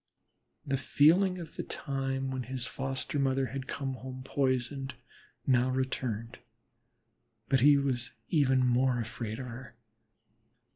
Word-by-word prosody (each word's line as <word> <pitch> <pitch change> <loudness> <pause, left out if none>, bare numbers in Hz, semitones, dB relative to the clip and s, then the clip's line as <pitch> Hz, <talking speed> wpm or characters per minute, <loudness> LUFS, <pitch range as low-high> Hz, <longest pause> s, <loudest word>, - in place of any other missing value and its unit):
The 135 -1 0
feeling 180 +8 +4
of 165 -3 -9
the - - -1
time 135 -1 -2
when 130 -1 -2
his 130 0 -3
foster 135 +3 -2
mother 135 -1 +2
had 130 +2 -5
come 135 -1 -3
home 130 0 -7
poisoned, 135 0 -1 0.5
now 130 -1 +3
returned; 125 -3 -2 1.1
but 135 0 +4
he 145 +3 +7
was 130 -3 -1 0.2
even 135 -5 +3
more 125 0 +3
afraid 110 -1 -4
of 130 - -5
her. 125 0 -9
130 Hz, 130 wpm, -31 LUFS, 125-135 Hz, 1.1 s, he